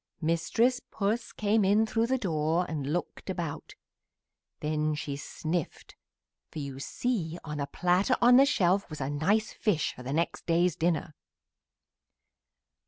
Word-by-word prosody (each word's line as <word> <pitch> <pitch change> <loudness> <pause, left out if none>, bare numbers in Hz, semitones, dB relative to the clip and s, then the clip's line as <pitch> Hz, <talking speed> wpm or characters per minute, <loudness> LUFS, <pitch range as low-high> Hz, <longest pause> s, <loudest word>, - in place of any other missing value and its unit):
"Mistress 200 +10 +1
Puss 215 +3 -1
came 215 0 +1
in 205 +3 +4
through 225 +1 0
the 265 +2 +1
door 165 -4 0
and 145 -3 -3
looked 175 +3 -4
about; 170 -5 -4 0.8
then 155 0 0
she 145 -1 -4
sniffed, 160 +3 -4 0.5
for - - -10
you 140 -3 -5
see 175 - -2
on 150 -1 -5
a 140 - -2
platter 180 - +2
on 245 +1 +6
the 275 +1 +7
shelf 195 -8 +2
was 155 -2 -7
a 135 +1 -2
nice 200 +9 +1
fish 200 -9 0
for - - -11
the 125 +2 -5
next 165 +4 -1
day's 170 0 +3
dinner. 160 -2 0
170 Hz, 145 wpm, -29 LUFS, 155-210 Hz, 0.8 s, the